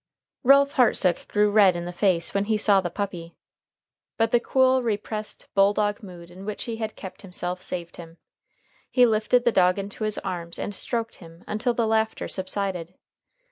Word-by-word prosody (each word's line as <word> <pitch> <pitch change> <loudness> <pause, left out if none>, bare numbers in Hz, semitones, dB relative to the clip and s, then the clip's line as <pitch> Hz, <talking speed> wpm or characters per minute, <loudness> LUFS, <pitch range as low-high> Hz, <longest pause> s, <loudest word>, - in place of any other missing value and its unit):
Ralph 280 +2 +5
Hartsook 200 -8 +3
grew 210 0 +2
red 200 -4 +5
in 175 0 -4
the 175 - -6
face 175 -2 +1
when 200 0 0
he 215 0 +1
saw 205 -2 +4
the 175 - -3
puppy. 175 -3 -5 0.8
But 225 0 +1
the 240 - +4
cool, 260 +1 +3
repressed, 215 -1 -4
bulldog 205 +1 +2
mood 175 -4 -12
in 185 +2 -11
which 210 +1 -5
he 230 -2 -5
had 220 -1 -4
kept 190 - -10
himself 180 -1 -5
saved 175 -2 -6
him. 165 -1 -11 0.7
He 250 -1 +5
lifted 225 +2 +2
the 240 - +4
dog 180 -2 +3
into 200 +2 -5
his 215 -1 -1
arms 175 -3 -5
and 205 - -4
stroked 230 +3 -3
him 165 0 -15
until 225 +3 -1
the 230 - +1
laughter 220 0 0
subsided. 185 -2 -3
205 Hz, 180 wpm, -25 LUFS, 180-220 Hz, 0.8 s, Ralph